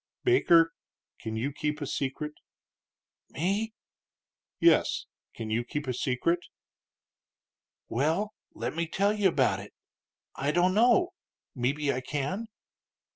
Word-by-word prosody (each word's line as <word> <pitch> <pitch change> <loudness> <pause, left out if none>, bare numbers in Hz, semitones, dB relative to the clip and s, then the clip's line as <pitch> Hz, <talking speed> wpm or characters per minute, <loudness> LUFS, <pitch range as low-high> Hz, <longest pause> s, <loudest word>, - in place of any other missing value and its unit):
"Baker, 170 - +5 0.5
can 110 0 -4
you 125 +6 -1
keep 150 +1 -2
a 145 - -3
secret?" 140 +2 -3 1.0
"Me?" 205 +7 -1 0.8
"Yes; - - +4 0.3
can 110 -1 -5
you 115 +2 +1
keep 145 +4 -4
a 130 - -1
secret?" 135 +7 +1 1.5
"Well, 160 - 0 0.2
let - - -3
me 170 0 -1
tell 200 +5 +2
you 205 -2 +3
about 140 -8 +2
it; - - -11 0.6
I 140 - -1
don't 180 +2 +3
know; 240 - +4 0.4
mebbe 140 +3 0
I 130 - -2
can." 145 - -3
150 Hz, 120 wpm, -29 LUFS, 135-195 Hz, 1.5 s, Baker